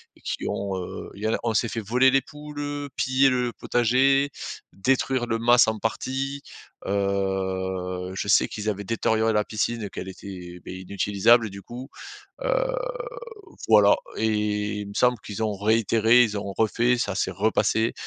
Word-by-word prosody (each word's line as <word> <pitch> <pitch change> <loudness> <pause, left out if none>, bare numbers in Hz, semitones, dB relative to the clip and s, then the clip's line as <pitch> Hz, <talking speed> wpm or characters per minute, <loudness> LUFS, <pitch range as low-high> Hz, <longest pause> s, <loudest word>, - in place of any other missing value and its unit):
et - - -23
qui - - -4
ont, 100 -1 -2
heu 90 - -6
il 105 - -10
y - - +1
en 110 - +1
a - - +1
on 115 -1 0
s'est 115 - +2
fait 115 - -3
voler 125 +6 +4
les 135 0 +4
poules, 150 +2 -10
heu, 145 -1 -4
piller 130 +1 +3
le 125 -2 0
potager, 130 +5 +2 0.4
détruire 130 +4 +1
le 115 0 0
mas 120 0 +5
en 110 0 0
partie, 135 +5 -2 0.5
heu, 95 -2 -1
je 100 - -3
sais 100 - +4
qu'ils 110 0 -4
avaient 100 -1 -3
détérioré 110 +1 +1
la 105 0 +2
piscine 115 +2 -2
et 100 - -4
qu'elle 95 - -7
était, 90 -2 -9
beh 95 0 -7
inutilisable 100 +4 +3
du 100 0 -9
coup, 125 +3 -9 0.5
heu, - - +1 1.1
voilà 105 -2 +6 0.2
et 110 - 0 0.6
il 100 - -7
me 100 - -9
semble 125 -1 +3
qu'ils 105 +1 -5
ont 105 -2 -1
réitéré, 115 +3 +4
ils 105 -3 -1
ont 100 -1 -5
refait, 120 +3 +2
ça 105 -4 -1
s'est - - 0
repassé, 110 +2 +1
110 Hz, 175 wpm, -25 LUFS, 100-125 Hz, 1.1 s, voilà